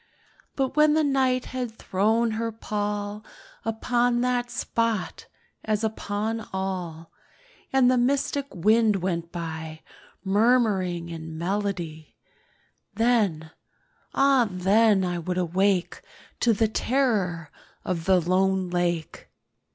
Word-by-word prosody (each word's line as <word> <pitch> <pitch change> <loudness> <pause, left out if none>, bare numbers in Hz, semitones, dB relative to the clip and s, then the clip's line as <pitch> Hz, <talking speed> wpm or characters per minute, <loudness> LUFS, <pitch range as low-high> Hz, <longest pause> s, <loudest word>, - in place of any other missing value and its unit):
But 265 -1 -1
when 300 0 +5
the 315 - +3
Night 260 -3 +1
had 245 -3 -4
thrown 220 +4 +1
her 230 +1 -2
pall 210 -1 -3 0.4
Upon 240 +2 +1
that 245 -1 0
spot, 230 -4 -2 0.4
as 215 0 -1
upon 220 +1 -3
all, 180 -4 -4 0.6
And 260 -2 +4
the 255 - +3
mystic 280 +2 0
wind 215 +4 +3
went 170 -2 -2
by 160 -2 -6 0.4
Murmuring 195 -5 +2
in 160 -1 -7
melody— 175 -4 -3 0.8
Then—ah 240 - 0
then 195 +2 +3
I 175 -1 -2
would 180 +2 -3
awake 185 +1 0 0.4
To 235 - +3
the 220 +1 +2
terror 210 - 0 0.3
of 170 -3 -2
the 190 -1 +4
lone 185 +1 +1
lake. 175 -2 -2
205 Hz, 105 wpm, -25 LUFS, 180-240 Hz, 0.8 s, when